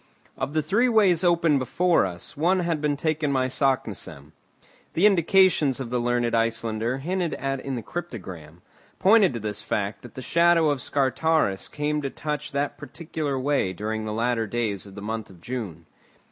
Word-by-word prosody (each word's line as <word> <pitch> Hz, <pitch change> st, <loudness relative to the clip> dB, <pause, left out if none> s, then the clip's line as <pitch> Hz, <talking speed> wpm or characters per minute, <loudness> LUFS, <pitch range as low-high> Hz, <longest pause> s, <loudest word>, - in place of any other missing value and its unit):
Of 135 Hz, +2 st, -4 dB
the 155 Hz, -, +2 dB
three 210 Hz, +11 st, +2 dB
ways 195 Hz, -7 st, +4 dB
open 170 Hz, -4 st, +3 dB
before 170 Hz, -, +2 dB
us, 90 Hz, -1 st, -7 dB
one 180 Hz, +5 st, +2 dB
had 165 Hz, -3 st, -1 dB
been 150 Hz, -1 st, 0 dB
taken 155 Hz, -1 st, 0 dB
by 130 Hz, -1 st, +1 dB
Saknussemm. 130 Hz, -, -2 dB, 0.6 s
The 175 Hz, -, +4 dB
indications 180 Hz, -7 st, +4 dB
of 125 Hz, -3 st, -5 dB
the 125 Hz, -, 0 dB
learned 120 Hz, -1 st, 0 dB
Icelander 115 Hz, +1 st, 0 dB
hinted 175 Hz, +4 st, -2 dB
at 135 Hz, 0 st, -2 dB
in 135 Hz, 0 st, -4 dB
the 120 Hz, -, -5 dB
cryptogram, 90 Hz, -, -8 dB, 0.3 s
pointed 200 Hz, -1 st, +5 dB
to -, -, -3 dB
this 105 Hz, -1 st, -4 dB
fact 100 Hz, +1 st, -2 dB
that 120 Hz, -, -13 dB
the 130 Hz, -, -7 dB
shadow 170 Hz, -1 st, +4 dB
of 140 Hz, -3 st, -2 dB
Scartaris 140 Hz, -5 st, +1 dB
came 150 Hz, 0 st, -1 dB
to 140 Hz, -, -3 dB
touch 150 Hz, +1 st, -4 dB
that 140 Hz, 0 st, -2 dB
particular 150 Hz, -1 st, -4 dB
way 130 Hz, -8 st, 0 dB
during 110 Hz, +3 st, -3 dB
the 110 Hz, -, -3 dB
latter 115 Hz, 0 st, 0 dB
days 105 Hz, -3 st, -2 dB
of 95 Hz, -, -13 dB
the 100 Hz, -, -8 dB
month 110 Hz, 0 st, -4 dB
of 95 Hz, -3 st, -15 dB
June. 110 Hz, -4 st, -6 dB
135 Hz, 175 wpm, -25 LUFS, 115-160 Hz, 0.6 s, pointed